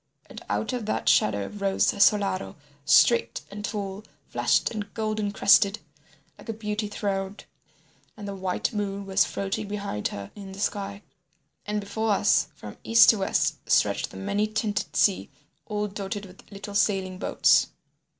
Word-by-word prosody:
And - - -11
out 105 - -1
of 240 -4 -4
that - - -2
shadow 100 -2 +3
rose 200 -2 0
Solaro 200 -2 +2 0.3
straight 235 +9 +4
and 205 +1 -7
tall, 205 -1 -4 0.3
flushed - - +1
and 205 -2 -5
golden 215 -2 -1
crested, 200 0 +4 0.6
like - - -13
a - - -1
beauty 210 -1 -3
throned, 200 -1 -3 0.7
and 205 -1 -7
the 200 - -4
white 190 +3 -2
moon 200 -1 -3
was 195 0 +3
floating 200 +2 -3
behind 200 - -3
her 100 -1 -8
in 195 -2 -9
the 195 - -10
sky. 200 0 -3 0.6
And 210 0 -1
before 215 +1 -1
us - - +3
from - - -10
east 230 0 +7
to 220 - -3
west 195 - 0
stretched - - +2
the - - -11
many 200 - -1
tinted 215 -1 -2
sea 195 -3 +2 0.4
all 210 -1 -2
dotted 200 0 -5
with 190 +2 -16
little 200 0 -8
sailing 195 -3 0
boats. - - +3
205 Hz, 155 wpm, -26 LUFS, 195-210 Hz, 0.7 s, east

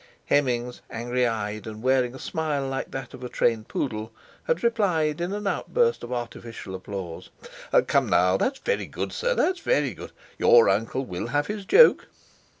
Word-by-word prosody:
Hemmings, 125 -3 0
angry 120 +2 0
eyed, 105 -2 -3
and 110 +1 -8
wearing 130 -1 +2
a - - -9
smile 150 -3 -2
like 135 0 -3
that 135 0 -7
of 130 - -10
a 125 - -5
trained 115 -3 0
poodle, 110 -4 -3 0.3
had - - 0
replied 175 -9 +1
in 175 +2 -2
an 205 +1 -4
outburst 470 - +1
of - - -7
artificial 115 -4 -6
applause: 95 -3 -7 0.6
"Come, - - +2
now, 90 +1 +4
that's 270 - 0
good, 475 - -2
sir—that's 470 -7 +1
very 145 - +1
good. - - -10 0.3
Your 120 -1 +6
uncle 115 +7 0
will 90 +1 -5
have 145 +4 0
his 205 -1 -5
joke!" 470 - +6
130 Hz, 160 wpm, -25 LUFS, 115-170 Hz, 0.6 s, Your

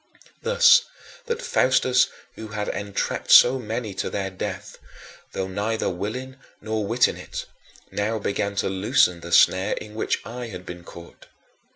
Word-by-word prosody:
Thus 485 0 +6 0.5
that 470 +1 -3
Faustus 130 - +3 0.3
who 110 - -8
had 105 -1 -4
entrapped 100 -1 -3
so 130 +2 +8
many 110 -2 -4
to 95 - -3
their 95 -1 -3
death 95 - -6 0.5
though 95 - -2
neither 105 +4 -2
willing 125 +9 -5 0.2
nor 110 -1 -3
witting 120 +3 +2
it - - -7 0.5
now 110 +2 -1
began 100 -1 -2
to - - 0
loosen 95 -2 +2
the 85 0 -9
snare 95 +2 +4
in 105 - -7
which 110 - -1
I 120 +1 -6
had 90 -4 -9
been 90 0 -8
caught. 85 0 -13
105 Hz, 150 wpm, -24 LUFS, 95-125 Hz, 0.5 s, so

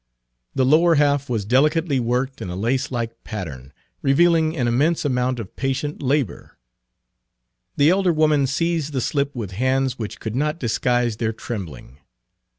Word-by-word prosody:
The 130 -1 +2
lower 165 +5 +5
half 145 -2 +2
was 110 -5 -1
delicately 145 - +2
worked 125 +3 -1
in - - -5
a 90 - -5
lacelike 115 +1 -2
pattern, 75 - -7 0.3
revealing 160 +3 +3
an 125 -3 +1
immense 145 +8 +1
amount 125 -2 0
of 110 -3 -8
patient 135 +2 -2
labor. 140 -2 -2 1.2
The 145 +3 +5
elder 190 -1 +3
woman 155 -3 +3
seized 160 +1 -1
the 130 - 0
slip 140 +2 -1
with 110 -6 -5
hands 130 +4 0
which 110 -2 -5
could 110 0 -5
not 150 +4 0
disguise 120 -1 0
their 110 0 -1
trembling. 80 - -7
130 Hz, 150 wpm, -22 LUFS, 115-150 Hz, 1.2 s, lower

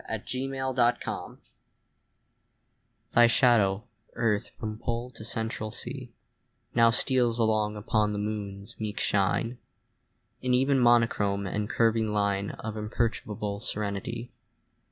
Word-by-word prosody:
AT 110 +1 -4
A 130 +1 -2
LUNAR 130 -2 -1 0.2
ECLIPSE - - -6 1.7
THY 120 0 +6
shadow, 110 -5 +3 0.3
Earth, 115 -3 0
from 110 0 -5
Pole 120 +1 -3
to 110 - -11
Central 110 -1 -3
Sea, - - -6 0.6
Now 115 -1 +6
steals 120 0 +3
along 110 -2 +1
upon 105 0 +1
the 105 - -3
Moon's 105 +1 -5
meek 105 -1 -3
shine 105 +5 +1 0.8
In 125 -1 +2
even 135 +1 +3
monochrome 115 -5 +3
and 105 +3 -2
curving 115 -2 +2
line 100 -1 0
Of 110 0 -6
imperturbable 105 -2 -2
serenity. 105 +4 -4
110 Hz, 115 wpm, -28 LUFS, 105-120 Hz, 1.7 s, THY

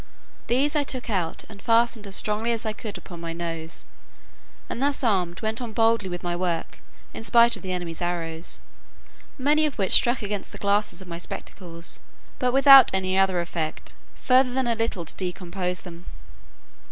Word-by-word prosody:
These 275 +5 +1
I 295 - +3
took 255 -4 -3
out 180 -5 -2
and 200 -2 -13
fastened 230 -2 +2
as 195 - -5
strongly 215 +2 +1
as 230 -1 -1
I 215 - -1
could 215 -1 -6
upon 175 -3 -11
my 165 -1 -5
nose, 165 -1 -5 0.8
and 240 - -5
thus 280 0 +1
armed, 180 -7 0
went 220 +2 -1
on 235 -3 -6
boldly 225 -3 +2
with 175 0 -6
my 175 0 -2
work, 175 -2 -3 0.3
in - - -7
spite 235 +1 +6
of - - -10
the 185 - -5
enemy's 175 -2 -4
arrows, 170 -1 -4 0.8
many 295 +3 +3
of 290 - -7
which 195 -3 0
struck 240 -1 +4
against 205 -1 -4
the - - -7
glasses 200 -2 0
of - - -17
my 170 -1 -7
spectacles, 170 -1 -2 0.4
but 250 -2 +1
without 275 +1 +8
any 185 0 0
other 190 -2 +2
effect, 165 -2 -5 0.2
further 255 0 +3
than 260 +1 0
a 235 - +2
little 225 -6 -2
to - - -7
discompose 180 0 -4
them. 175 -1 -11
200 Hz, 180 wpm, -24 LUFS, 175-235 Hz, 0.8 s, without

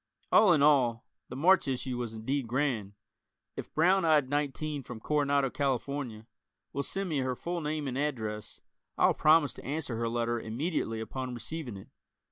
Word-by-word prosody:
All 210 -4 +7
in 150 -4 +4
all 125 -6 +3 0.2
the 125 - -7
March 175 +5 +4
issue 130 -1 -2
was 120 -2 -4
indeed 130 +4 -2
grand. 120 -5 -1 0.6
If - - -7
"Brown 185 +4 +3
Eyed 150 -5 +3
Nineteen 145 0 -1
from 125 -3 -9
Coronado, 140 0 +1
Calif.," 135 -4 0 0.9
will 140 - -1
send 195 +6 -3
me 155 -5 -1
her 130 -1 -1
full 170 +5 -4
name 150 -1 -2
and 130 0 -2
address, 110 -8 -3 0.4
I'll - - +4
promise 155 -2 +4
to - - -11
answer 140 -4 -3
her 115 0 -1
letter 120 0 -1
immediately 115 -1 -2
upon 130 +2 -5
receiving 120 -1 -5
it. 95 - -13
135 Hz, 165 wpm, -30 LUFS, 120-150 Hz, 0.9 s, All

